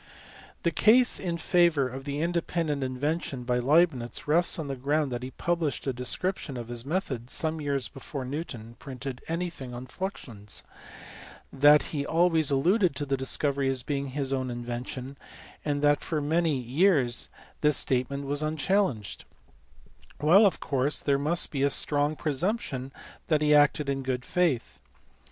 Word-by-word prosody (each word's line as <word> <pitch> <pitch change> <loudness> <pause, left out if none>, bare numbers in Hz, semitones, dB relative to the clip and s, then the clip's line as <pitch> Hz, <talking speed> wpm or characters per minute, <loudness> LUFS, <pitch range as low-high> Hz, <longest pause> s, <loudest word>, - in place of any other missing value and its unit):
The 170 - +2
case 240 +9 +5
in 175 -3 -3
favour 170 -5 +3
of 130 +2 -8
the 145 +1 -3
independent 165 -4 -1
invention 135 +1 -2
by 125 0 0
Leibnitz 140 -2 +1
rests 170 +4 +3
on 160 -3 -4
the 135 - -3
ground 145 +2 0
that 120 0 -3
he 130 - -5
published 170 +1 -2
a 135 - -1
description 130 +4 -2
of 120 -1 -7
his 120 -1 -4
method 135 - -3
some 160 +1 -1
years 140 -4 -1
before 135 0 -7
Newton 125 -5 -6
printed 135 -3 -7
anything 165 -7 -4
on 125 +1 -7
fluxions, 120 - -7 0.9
that 145 +2 +6
he 145 -2 -1
always 165 -1 +3
alluded 175 +5 +2
to 145 - -2
the 135 -1 0
discovery 135 +1 +1
as 130 -2 -1
being 140 +1 -2
his 135 0 -1
own 130 -1 -2
invention, 125 +2 -6 0.4
and 145 -1 -1
that 145 0 +3
for 155 - -2
many 160 0 +1
years 130 0 +2 0.3
this 150 -1 +3
statement 135 +2 -1
was 145 +1 0
unchallenged; 155 - -1 0.9
while 180 +8 +6
of 195 - -2
course 140 +1 0
there 140 -1 +2
must 155 +5 +1
be 140 - -2
a 140 - +3
strong 145 +2 +2
pre 155 0 -2
sumption 145 - -2 0.4
that 155 -2 +2
he 150 0 +4
acted 145 0 +4
in 135 -1 -1
good 130 -1 -3
faith. 140 - 0
145 Hz, 160 wpm, -27 LUFS, 130-160 Hz, 0.9 s, that